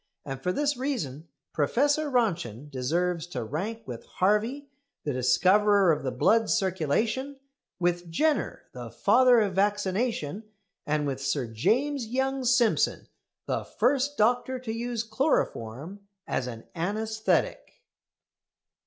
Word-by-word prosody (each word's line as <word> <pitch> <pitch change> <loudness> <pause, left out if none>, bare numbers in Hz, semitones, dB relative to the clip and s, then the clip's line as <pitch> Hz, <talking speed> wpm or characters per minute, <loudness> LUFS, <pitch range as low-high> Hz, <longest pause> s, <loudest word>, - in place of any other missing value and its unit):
And 135 -1 -6
for 180 - 0
this 290 +5 0
reason 170 - -3 0.3
Professor 285 - +1
Röntgen 165 - -1
deserves 165 +6 -1
to 130 -9 -4
rank 190 - -4
with 120 -3 -7
Harvey, 220 +9 0 0.4
the 145 - -2
discoverer 190 +9 +4
of 150 -1 0
the 135 - -2
blood's 220 - +3
circulation; 215 - -1 0.4
with 175 -1 0
Jenner, 305 - 0
the - - -7
father 250 -2 +4
of 200 -3 0
vaccination; 205 - 0 0.4
and 150 0 0
with 135 -2 -3
Sir 135 -1 -1
James 240 - 0
Young 265 +2 -1
Simpson, 240 -2 +2 0.4
the - - -2
first 280 +3 0
doctor 245 +4 +2
to 250 -3 -5
use 235 0 -3
chloroform 185 - -1 0.3
as 125 - -2
an 115 -2 -7
anæsthetic. 220 +5 0
205 Hz, 120 wpm, -27 LUFS, 150-245 Hz, 0.4 s, discoverer